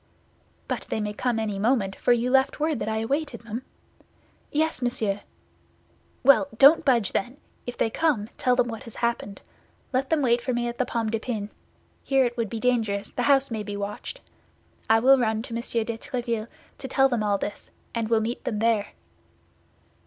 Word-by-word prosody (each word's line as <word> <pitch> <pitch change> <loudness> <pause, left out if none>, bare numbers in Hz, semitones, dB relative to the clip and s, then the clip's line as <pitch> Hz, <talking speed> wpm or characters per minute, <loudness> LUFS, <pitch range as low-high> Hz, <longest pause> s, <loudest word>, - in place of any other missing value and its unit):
"But - - -3
they - - -1
may 210 -1 -2
come 240 +2 -1
any 210 -3 -2
moment, 210 -3 +1
for - - +1
you 240 +1 +2
left 265 +2 +3
word 305 -4 0
that - - -2
I 220 0 -1
awaited 275 +2 -2
them?" 230 +1 -5 0.9
"Yes, 315 -2 0
monsieur." 220 -5 -1 1.0
"Well, 275 +2 +6
don't 285 +6 +7
budge, 240 -7 +2
then; 245 +7 -2 0.3
if 245 - -5
they 225 - +1
come, 265 -7 +1
tell 250 -1 +2
them 245 -1 +2
what 225 -2 -6
has 230 - -11
happened. 235 -4 -2 0.5
Let 265 +1 0
them 315 -3 +2
wait 240 -1 +3
for 255 +1 -2
me 240 0 0
at 240 0 -5
the 255 - +1
Pomme 225 -2 -1
de 225 - 0
Pin. 215 -3 -4 0.5
Here 270 -1 +3
it 240 0 -2
would 230 -3 -2
be 225 - -4
dangerous; 220 -5 0
the - - -3
house 275 -2 +4
may 220 -1 -2
be 205 -1 -5
watched. 205 - -6 0.7
I 225 0 +6
will 265 +3 +6
run 220 -2 0
to 230 - -8
Monsieur 230 0 -1
de 225 0 -5
Tréville 235 -3 -3 0.3
to 265 - -5
tell 270 +1 +4
them 240 -4 -1
all 205 -1 +1
this, 205 +1 -6 0.2
and 230 -2 -2
will 225 -1 +3
meet 230 +2 -3
them 210 - -2
there." 220 -1 +1
235 Hz, 195 wpm, -25 LUFS, 220-255 Hz, 1.0 s, don't